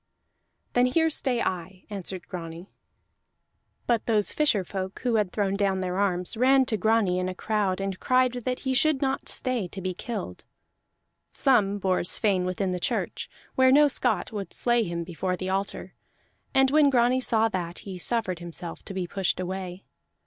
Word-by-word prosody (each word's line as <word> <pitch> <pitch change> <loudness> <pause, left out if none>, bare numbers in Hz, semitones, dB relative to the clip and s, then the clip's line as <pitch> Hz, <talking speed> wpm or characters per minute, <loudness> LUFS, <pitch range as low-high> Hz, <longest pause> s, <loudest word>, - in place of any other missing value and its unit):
"Then 245 0 +4
here 320 +5 +2
stay 255 -5 0
I," 185 +1 -4
answered 190 -2 -6
Grani. 170 +1 -7 1.1
But 235 -3 0
those 215 -3 +2
fisher 270 -10 +2
folk 190 +1 -5
who 245 -2 +1
had 205 -4 0
thrown 200 -2 0
down 200 -1 +1
their 185 +1 -2
arms 180 0 0
ran 260 +3 +4
to 220 - 0
Grani 210 -3 +2
in 185 0 -1
a 185 - -5
crowd, 200 -3 0
and 195 -1 -3
cried 255 0 +3
that 250 +1 -3
he 265 -1 -1
should 285 +1 +2
not 270 0 -1
stay 250 -7 -1
to 190 - -8
be 185 0 -3
killed. 195 - -6 0.9
Some 205 -7 +2
bore 185 -2 +1
Sweyn 185 0 +2
within 185 +1 -1
the 180 - -2
church, - - -2 0.2
where 260 0 +5
no 295 +2 +7
Scot 250 -4 0
would 205 -3 -5
slay 240 -1 +2
him 170 -5 -2
before 180 +2 -3
the 185 +1 -3
altar; 195 +1 -3 0.6
and 265 0 +4
when 300 -1 +5
Grani 250 0 +3
saw 225 -3 +2
that, 175 -4 -4
he 190 -3 -6
suffered 185 -4 -1
himself 170 0 -7
to 195 - -8
be 185 -2 -1
pushed 190 +1 -1
away. 185 0 -5
200 Hz, 175 wpm, -26 LUFS, 185-245 Hz, 1.1 s, no